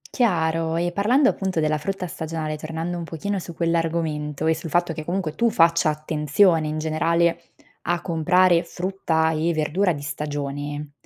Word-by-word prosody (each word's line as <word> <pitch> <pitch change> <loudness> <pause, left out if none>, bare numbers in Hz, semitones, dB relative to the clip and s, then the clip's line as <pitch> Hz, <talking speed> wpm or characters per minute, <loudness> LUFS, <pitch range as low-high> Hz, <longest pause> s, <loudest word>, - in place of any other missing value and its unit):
Chiaro, 165 -8 +1
e 175 +1 0
parlando 245 +9 +3
appunto 190 -4 -2
della 155 0 +1
frutta 195 +4 -3
stagionale, 160 -2 -4
tornando 165 +3 -4
un - - -4
pochino 190 +5 -3
su 170 -1 -9
quell'argomento 160 -3 -1
e 160 - +4
sul 160 +1 -6
fatto 175 0 +1
che 155 0 -6
comunque 175 -3 -2
tu 235 +6 +2
faccia 165 -3 +3
attenzione 155 +2 +2
in 155 +1 -3
generale 165 +2 +1 0.4
a 175 +1 0
comprare 175 +1 +3
frutta 170 -3 -1
e 160 +2 0
verdura 175 +5 +1
di 145 -2 -5
stagione, 145 0 -4
165 Hz, 155 wpm, -23 LUFS, 155-175 Hz, 0.4 s, e